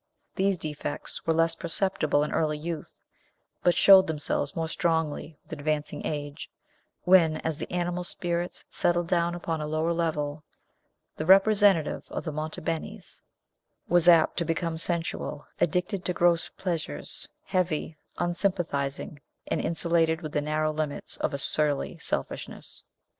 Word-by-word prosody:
These 195 0 +2
defects 150 -1 -5
were 165 - +4
less 165 0 +3
perceptible 165 -3 +1
in 150 - -3
early 150 -1 +1
youth, 160 0 -6 0.6
but 175 - +3
showed 195 -1 +8
themselves 145 -2 -2
more 165 -1 -1
strongly 160 -2 -1
with - - -10
advancing 150 0 -2
age, 145 -1 -5 0.5
when, 170 -4 +5
as 160 -2 -2
the - - -6
animal 175 0 -1
spirits 175 0 -3
settled 175 0 +1
down 170 0 +1
upon 165 -2 -3
a 150 - -3
lower 155 +2 0
level, 155 -3 -2 0.7
the 155 - -3
representative 195 -3 +5
of - - -4
the 160 - -3
Monte 155 +1 -4
Benis 165 0 -5 0.7
was 175 0 +5
apt 165 -2 +5
to 170 - +2
become 165 0 -2
sensual, 165 -3 -2
addicted 180 +3 0
to 180 - 0
gross 175 -1 +2
pleasures, 165 - -4 0.2
heavy, 170 -4 -1 0.2
unsympathizing, 175 -6 -1 0.3
and - - 0
insulated 165 0 +1
within 150 -1 -2
the - - -4
narrow 155 0 +1
limits 150 -2 -3
of - - -1
a 140 - -2
surly 145 0 0
selfishness. - - -3
165 Hz, 140 wpm, -27 LUFS, 155-175 Hz, 0.7 s, showed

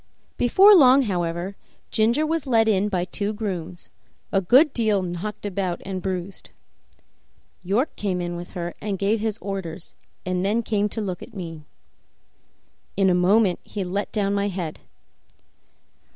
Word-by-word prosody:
Before 385 - +6
long, 275 -6 +7
however, 175 -2 -2 0.4
Ginger 235 +7 +2
was 320 -2 -2
led 225 -3 +3
in 205 -1 +2
by 180 -3 -1
two 205 +3 -3
grooms, 185 -5 -5 0.4
a 195 - +2
good 265 - +5
deal 215 -5 +1
knocked 180 +5 -5
about 190 -3 -2
and 190 -1 -4
bruised. 185 0 -5 1.1
York 205 - 0
came 195 -3 -2 0.2
with 175 0 -7
her 175 0 -4
and 205 -2 -2
gave 205 +4 +1
his 220 0 -2
orders, 190 -5 -5 0.3
and 180 0 -1
then 215 +4 +1
came 210 -1 0
to 220 - -4
look 185 -4 -4
at 235 - -11
me. 165 -5 -7 1.3
In 195 -1 +4
a - - +3
moment 185 +1 +3
he 205 - -5
let 190 +3 -3
down 200 -2 0
my 200 0 0
head. 180 -5 -4
200 Hz, 150 wpm, -23 LUFS, 180-220 Hz, 1.3 s, long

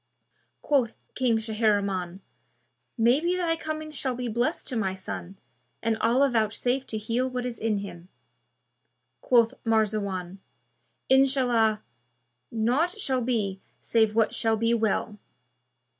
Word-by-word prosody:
Quoth 265 -6 +1 0.2
King 245 -3 +2
Shahriman, 205 -5 0 0.8
"Maybe 275 +10 +3
thy 340 -2 +1
coming 310 -1 -5
shall 265 -3 -3
be 250 0 -3
blessed 235 +2 -1
to 255 - -3
my 190 -4 -1
son 190 0 -7 0.5
and 225 0 +2
Allah 255 +5 +3
vouchsafe 245 +4 0
to 220 - -3
heal 230 +4 -1
what 250 -1 -3
is 245 -2 -5
in 220 -1 0
him." 185 -3 -8 1.1
Quoth 235 -1 +4
Marzawan, 200 -5 0 0.7
"Inshallah, 250 -5 +3 0.7
naught 255 - +1
shall 265 -10 0
be 210 -6 -1 0.2
save 220 -2 +2
what 225 -1 +2
shall 225 -1 +1
be 230 +1 +2
well!" 215 -2 0
230 Hz, 120 wpm, -27 LUFS, 215-255 Hz, 1.1 s, Quoth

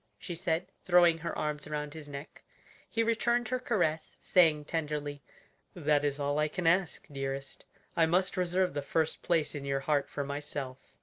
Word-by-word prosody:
she 175 - -6
said, 170 0 -1 0.2
throwing 175 -2 +5
her 170 +1 -4
arms 150 -1 -2
around 150 -1 -3
his 155 -2 -9
neck. 140 +1 -8 0.5
He 230 - +1
returned 235 +1 +1
her 255 0 0
caress, 175 -11 0
saying 160 -5 +4
tenderly, 150 -3 -3 0.5
"That 150 -4 +2
is 145 0 0
all 145 +1 0
I 150 - +3
can 175 +3 -4
ask, 175 +2 +2
dearest; 135 0 -4 0.3
I 165 -1 +4
must 185 +3 +2
reserve 180 -1 +1
the 145 - -1
first 160 +3 0
place 160 -5 +1
in 145 - -5
your 135 -1 -1
heart 145 0 +1
for 145 - -3
myself." 140 -2 -4
155 Hz, 175 wpm, -31 LUFS, 145-175 Hz, 0.5 s, throwing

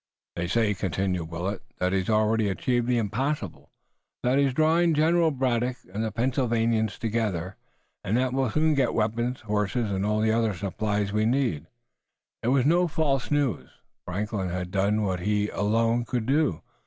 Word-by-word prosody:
"They 85 0 -2
say," 105 +2 +2
continued 95 -2 -2
Willet, 90 +4 -3 0.2
"that 90 +1 0
he's 95 0 0
already 110 0 +2
achieved 120 +5 0
the 125 -1 +2
impossible, 115 - -2 0.5
that 130 +3 +3
he's 140 -1 +3
drawing 160 +4 +3
General 165 +2 +3
Braddock 125 -3 0 0.2
and 110 +2 -2
the 110 - -2
Pennsylvanians 115 -2 0
together, 105 -6 -2 0.5
and 105 +5 0
that 130 0 0
we'll 135 -2 +1
soon 155 +5 +2
get 135 -4 +1
weapons, 120 +3 -1
horses 105 +1 -1
and 95 0 -1
all 105 +1 +1
the 110 0 +2
other 115 -3 +1
supplies 105 +2 -2
we 105 +1 +2
need." 120 - 0 0.7
It - - -3
was 130 0 +3
no 175 +4 +4
false 145 -5 0
news. 145 -4 0 0.3
Franklin 100 0 -3
had 90 0 -4
done 100 +2 +1
what 95 -3 -1
he 105 +2 0
alone 115 +3 +1
could 120 -3 -2
do. 135 - +1
110 Hz, 165 wpm, -26 LUFS, 100-130 Hz, 0.7 s, no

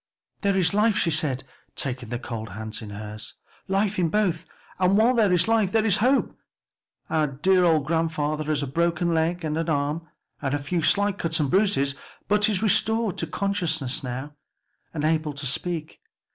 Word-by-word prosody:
"There 200 -2 +1
is 180 -1 +2
life," 210 +1 +3
she 170 - +1
said, 150 -4 0 0.3
taking 125 -3 -4
the 120 - -2
cold 115 -3 -6
hands 110 +3 -6
in 110 - -8
hers, 105 +1 -7 0.3
"life 195 +1 0
in 170 -2 +2
both; 180 -4 0 0.3
and 185 +2 +3
'while 230 +4 +4
there 220 -5 +3
is 180 +2 +3
life 220 -4 +2
there 225 -1 +2
is 205 -3 +4
hope.' 255 +5 +2 0.8
Our 155 -1 +2
dear 180 +7 +2
old 160 -4 +3
grandfather 155 -1 -1
has 150 -1 0
a - - -3
broken 170 +4 0
leg 165 +1 0
and 155 -1 -1
arm 150 +2 -1 0.3
and 140 -1 -1
a - - +1
few 155 +5 -2
slight 205 +4 +2
cuts 160 -1 0
and 145 -3 0
bruises, 185 -9 +2 0.3
but 210 +1 +4
is 210 0 0
restored 220 0 +2
to 165 - -1
consciousness 160 -8 -1
now, 130 +4 -5 0.6
and 150 - -4
able 155 -1 +1
to 145 0 -6
speak. 155 +4 -3
165 Hz, 180 wpm, -25 LUFS, 145-195 Hz, 0.8 s, while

